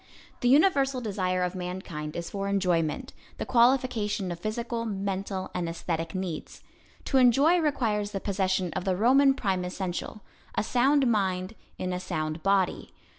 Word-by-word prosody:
The 245 - +2
universal 275 -3 +4
desire 185 -5 -1
of 180 0 -1
mankind 180 -4 -5
is 170 0 -5
for 200 0 -3
enjoyment; 180 -6 0 0.2
the - - -3
qualification 235 -6 +2
of 170 - -5
physical, 230 +4 -3
mental 195 -2 -3
and 170 -2 -2
aesthetic 165 0 -3
needs. 185 -4 -5 0.4
To 270 - +2
enjoy 275 +8 +5
requires 225 -10 0
the 200 - -4
possession 190 -3 -1
of 185 - -3
the 185 -1 0
Roman 270 +5 +5
prime 190 -7 -1
essential; 185 +3 -4 0.3
a - - +1
sound 270 +5 +3
mind 190 -4 0 0.2
in 185 0 -3
a 180 - -2
sound 155 -3 -3
body. 195 -1 0
195 Hz, 150 wpm, -27 LUFS, 180-240 Hz, 0.4 s, enjoy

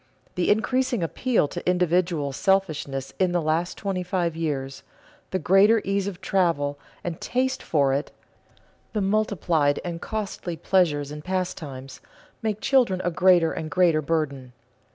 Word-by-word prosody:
The 180 - 0
increasing 245 +1 +1
appeal 230 - +1
to 175 0 -3
individual 175 -4 +1
selfishness 155 -8 0
in 185 -2 +2
the 175 - +2
last 165 +2 -1
twenty 195 -3 -2
five 175 -2 -1
years, 135 -4 -3 0.5
the 185 - -1
greater 195 +6 +5
ease 195 0 0
of 195 -2 -6
travel 165 -7 0 0.2
and 170 -2 -5
taste 260 +1 -1
for 140 -4 +2
it, 140 +2 -1 0.8
the 210 - 0
multiplied 185 -8 +1
and 170 -1 -4
costly 200 -5 -4
pleasures 150 -7 +1
and 150 0 -7
pastimes, 155 -8 -4 0.4
make 215 -2 -2
children 250 -9 +3
a 175 - 0
greater 175 -1 +4
and 160 -1 -5
greater 165 -1 +3
burden. 140 -5 -2
175 Hz, 140 wpm, -25 LUFS, 150-195 Hz, 0.8 s, greater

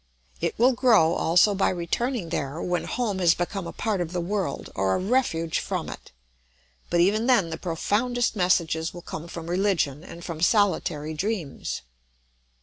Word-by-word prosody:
It - - -2
will 245 +3 +5
grow 225 -10 +4
also 180 +6 +4
by 195 - +2
returning 185 +3 -2
there, 145 -1 -3
when 175 0 -1
home 220 -6 -2
has 170 -2 +4
become 175 +1 -3
a - - -5
part 210 -5 -1
of 175 0 -4
the 180 - -1
world 180 -4 -3
or 95 0 +1
a - - 0
refuge 185 -7 0
from - - -3
it; - - -10 0.8
but 175 - +2
even 210 +6 +3
then 200 -10 +3
the 160 - -3
profoundest 230 +8 0
messages 170 -3 +1
will 175 - -9
come 160 +2 -7
from 165 -1 -7
religion 175 -6 0
and 170 -1 -10
from 165 -2 -6
solitary 170 -6 +2
dreams. 165 - -3
175 Hz, 165 wpm, -25 LUFS, 165-210 Hz, 0.8 s, will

